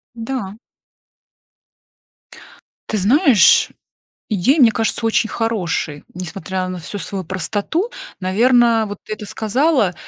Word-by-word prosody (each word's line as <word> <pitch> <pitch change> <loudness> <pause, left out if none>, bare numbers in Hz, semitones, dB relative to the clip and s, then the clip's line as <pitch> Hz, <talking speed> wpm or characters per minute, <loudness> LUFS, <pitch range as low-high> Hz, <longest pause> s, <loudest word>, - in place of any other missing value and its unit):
Да. 225 -3 -5 2.3
Ты 215 - -1
знаешь, 245 - +4 0.6
идея, 220 - +2
мне 230 -3 +6
кажется, 225 0 +1
очень 225 0 +1
хорошей, 175 -10 -2
несмотря 185 +1 -5
на 185 -1 -6
всю 200 +6 -6
свою 190 +1 -4
простоту. 205 - -2 0.3
Наверно, 230 +4 +3
вот 205 -1 -7
ты - - -8
это 210 0 -6
сказала, 220 - +1
215 Hz, 105 wpm, -18 LUFS, 185-235 Hz, 2.3 s, мне